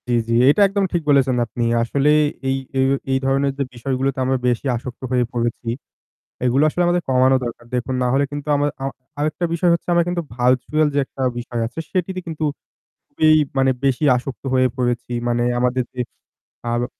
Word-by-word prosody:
জি, - - +1
জি। 115 - 0 0.2
এটা 150 - +4
একদম 195 0 0
ঠিক 175 - +1
বলেছেন 135 -3 +4
আপনি। 120 +1 -4 0.2
আসলেই 145 +5 +3 0.3
এই 135 - +1 0.2
যে 135 - -1 0.3
এই 135 - +3
ধরনের 135 +1 +2
যে 140 - 0
বিষয়গুলোতে 135 +2 -2
আমরা 130 +1 +1
বেশি 120 +2 0
আসক্ত 120 +1 -7
হয়ে 125 -1 +2
পড়েছি। 120 0 -2 0.8
এগুলো 130 +4 +3
আসলে 175 +3 0
আমাদের 175 0 +1
কমানো 130 +1 +4
দরকার। 120 0 -6
দেখুন 125 +1 -2
না 125 - +2
হলে 140 +1 +3
কিন্তু 145 0 -6
আমাদের 145 0 0
আমা 135 0 -2 0.3
আরেকটা 155 +4 -1
বিষয় 170 +1 +2
হচ্ছে 170 - -3
আমার 170 0 +4
কিন্তু 175 -1 -1
ভার্চুয়াল 130 +5 +2
যে 145 - +2
একটা 135 - -9 0.2
বিষয় 120 -1 -4
আছে 120 - -8
সেটিতে 185 0 -1
কিন্তু 160 -1 -4 0.6
খুবই 155 - +2 0.3
মানে 135 0 +4
বেশি 135 +2 +1
আসক্ত 130 +2 -6
হয়ে 130 0 +4
পড়েছি। 120 -1 -1 0.2
মানে 120 0 +1 0.2
আমাদের 125 +1 +1
যে 125 - -4 0.6
ভালো 120 0 -1
135 Hz, 185 wpm, -20 LUFS, 125-150 Hz, 0.8 s, এটা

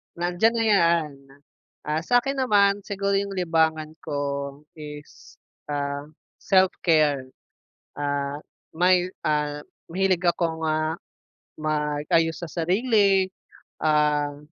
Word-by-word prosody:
Nandiyan 175 +6 +1
na 230 - +1
'yan. 170 -7 +3 0.8
Ah, 155 +1 0
sa'kin 250 +5 +2
naman, 205 -5 +3
siguro 200 0 -1
yung 200 0 -1
libangan 160 -3 +1
ko 140 -1 -3
is, 150 -1 -11 0.3
ah, 145 0 -3 0.3
self-care. 160 -7 +2 0.7
Ah, 145 0 -2 0.4
may 180 +1 +3 0.2
ah, 150 -1 0 0.3
mahilig 185 +1 +1
akong, 170 -2 0
ah, 155 +1 0 0.6
mag-ayos 155 +1 0
sa 170 - -5
sarili, 195 - +2 0.6
ah 150 -2 +2
160 Hz, 95 wpm, -24 LUFS, 150-190 Hz, 0.8 s, yan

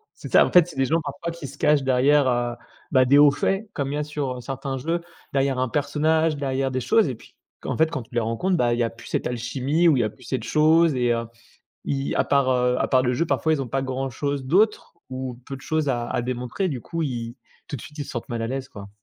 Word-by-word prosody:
C'est - - -10
ça, - - +7
en - - -4
fait, 180 -2 +6
c'est - - -11
des 135 0 +1
gens 160 +5 +1
parfois 160 +3 -5
qui 165 -4 -8
se 140 - -12
cachent 150 -2 +3
derrière, 135 +2 +3
heu, 120 -1 0 0.4
bah, 130 -1 +5
des 140 +3 +5
hauts 145 0 +7
faits 195 +8 -1
comme 140 -2 -2
il - - -2
y - - -1
a 150 - -1
sur, 145 -4 -3
heu, - - -7
certains 135 +1 -4
jeux, 165 +6 -2 0.3
derrière 135 -1 +1
un 130 -1 0
personnage, 155 +3 +1
derrière 135 -1 -1
des 130 0 -2
choses 220 - +3
et 130 - -4
puis, - - -19 0.3
q - - -6
en - - -2
fait, 160 0 +3
quand 150 - -3
tu 115 - -22
les - - +3
rencontres, 115 +12 0
bah, 120 -4 +2
il 120 - -1
y - - +3
a 115 - 0
plus 115 - -14
cette - - -1
alchimie 135 +7 0
ou 160 - +5
il 120 - +2
y - - -1
plus 130 - -18
cette 125 -1 -3
chose 155 +5 +4
et 120 -1 +2
heu, 115 0 -2 0.6
ils 140 -1 -1
à - - +3
part, 140 -2 +2
heu, 125 0 +2
à - - +1
part 130 -1 +3
le 125 0 +1
jeu, 165 +7 0
parfois, 160 -1 +1
ils 145 - -1
ont 130 - -4
pas 135 +2 -1
grand 135 0 -3
chose 140 +2 -3
d'autre 200 +10 +2 0.2
ou 130 -1 -5
peu 135 - -6
de 130 - -12
choses 155 +1 -1
à 120 -2 -1
à - - -1
démontrer 125 +8 -2
du 130 -6 -4
coup, 165 -1 -4
ils 120 -4 -4 0.3
tout 150 - -5
de - - -11
suite, 150 - -12
ils 145 - -3
se - - -11
sentent 120 - -5
mal 115 -1 -3
à 115 - -2
l'aise, 130 +1 -4
quoi. 100 -5 -10
135 Hz, 285 wpm, -24 LUFS, 125-150 Hz, 0.6 s, ça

